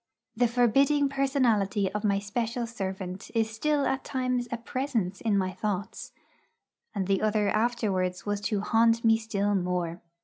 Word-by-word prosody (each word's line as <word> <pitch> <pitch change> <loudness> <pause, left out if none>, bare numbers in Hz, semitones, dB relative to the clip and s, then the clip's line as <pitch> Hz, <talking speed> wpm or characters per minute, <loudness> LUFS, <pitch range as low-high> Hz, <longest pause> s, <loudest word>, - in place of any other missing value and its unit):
The 240 +2 +3
forbidding 275 +5 +3
personality 240 -8 +1
of 210 +1 -3
my 200 -2 +2
special 230 +4 -2
servant 190 -4 -5
is 225 -1 +1
still 290 +6 0
at 265 0 -1
times 255 -2 -1
a 240 - -1
presence 230 -6 -2
in 215 -3 +1
my 185 -1 0
thoughts; 200 0 -4 0.8
and 195 -2 -1
the 195 0 +1
other 215 -1 +2
afterwards 215 -6 0
was 205 -1 -1
to 205 0 -1
haunt 230 +2 +3
me 225 0 +5
still 205 -2 -1
more. 180 -2 -1
215 Hz, 150 wpm, -28 LUFS, 195-240 Hz, 0.8 s, me